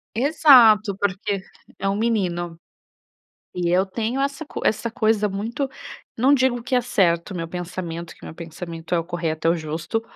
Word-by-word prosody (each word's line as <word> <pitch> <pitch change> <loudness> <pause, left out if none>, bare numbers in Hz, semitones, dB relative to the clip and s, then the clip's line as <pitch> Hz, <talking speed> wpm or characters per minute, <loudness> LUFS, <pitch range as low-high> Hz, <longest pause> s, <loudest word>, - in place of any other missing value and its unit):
Exato. 235 -7 +6
Porque 200 0 -1 0.4
é 195 - -2
um 195 - +1
menino. 175 -7 -1 1.0
E 175 -1 -1
eu 185 +2 +3
tenho 230 +6 -2
essa 280 +3 -2
co - - -7
essa 225 +2 0
coisa 215 -2 +1
muito 230 +8 -3 0.5
não 265 +5 +4
digo 255 -3 +1
que 255 - -2
é 250 - +4
certo 185 -8 +1
o - - -7
meu 165 -1 -4
pensamento. 170 -1 -6
Que - - -16
meu - - -8
pensamento 165 0 -6
é 170 - +3
o 165 - -2
correto, 165 -2 -2
é - - +5
o 170 - +2
justo. 160 +8 -3
195 Hz, 175 wpm, -23 LUFS, 170-235 Hz, 1.0 s, Exato